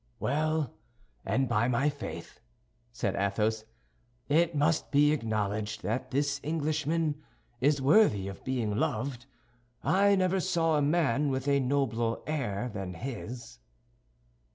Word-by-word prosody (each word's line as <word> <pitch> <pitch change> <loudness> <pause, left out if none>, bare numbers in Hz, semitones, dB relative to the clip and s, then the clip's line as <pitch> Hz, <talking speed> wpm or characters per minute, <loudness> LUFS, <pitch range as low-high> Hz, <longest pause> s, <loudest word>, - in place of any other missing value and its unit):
"Well, 155 0 0 0.5
and 135 0 +1
by 115 0 +2
my 125 +3 +2
faith," 145 -1 -7 0.5
said 110 -5 -2
Athos, 105 +3 0 0.6
"it 165 +2 +3
must 150 +2 +1
be 145 0 +4
acknowledged 110 -5 -2
that 115 +5 -2
this 140 +1 0
Englishman 155 0 -1 0.4
is 140 +1 +2
worthy 135 - +4
of 100 - -8
being 120 -5 -1
loved. 120 +3 -2 0.6
I 200 +3 +4
never 185 0 +2
saw 170 -3 +1
a 150 - +2
man 145 -2 +2
with 130 0 -2
a 140 0 +3
nobler 125 -4 0
air 125 -8 -2
than 95 -3 -5
his." 120 - -7
140 Hz, 125 wpm, -29 LUFS, 115-155 Hz, 0.6 s, be